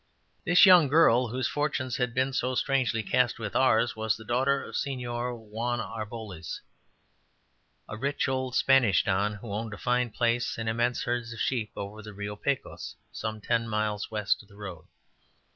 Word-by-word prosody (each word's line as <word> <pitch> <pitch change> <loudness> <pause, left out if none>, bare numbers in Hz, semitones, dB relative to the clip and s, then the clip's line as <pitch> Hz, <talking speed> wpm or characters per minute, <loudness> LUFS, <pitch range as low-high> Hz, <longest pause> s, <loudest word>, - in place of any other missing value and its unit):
This 175 +2 +7
young 180 -5 +8
girl, 130 -4 +5
whose 125 +3 -1
fortunes 140 -4 -1
had 125 -2 -1
been 130 +1 +1
so 130 0 0
strangely 125 -4 +1
cast 125 +4 +2
with 110 -3 -5
ours, 120 -3 +3
was 110 -1 0
the 110 - -12
daughter 135 +4 +1
of - - -10
Señor 125 -3 -3
Juan 115 +2 -3
Arboles, 110 -5 -6 1.3
a - - -6
rich 140 +6 -1
old 130 -1 -2
Spanish 135 -6 +4
Don 100 +1 0
who 105 0 -8
owned 110 0 -4
a - - -12
fine 125 +1 +1
place 120 +1 0
and 115 0 -4
immense 120 +2 0
herds 120 -1 -2
of 115 - -10
sheep 115 -5 -1
over 100 +2 -6
on - - -10
the 110 -1 -10
Rio 100 +1 -5
Pecos, 140 +5 -3 0.2
some 110 0 -5
ten 115 +1 0
miles 105 -1 -1
west 105 -2 0
of 100 - -21
the 100 - -17
road. 95 -6 -8
115 Hz, 175 wpm, -28 LUFS, 110-130 Hz, 1.3 s, young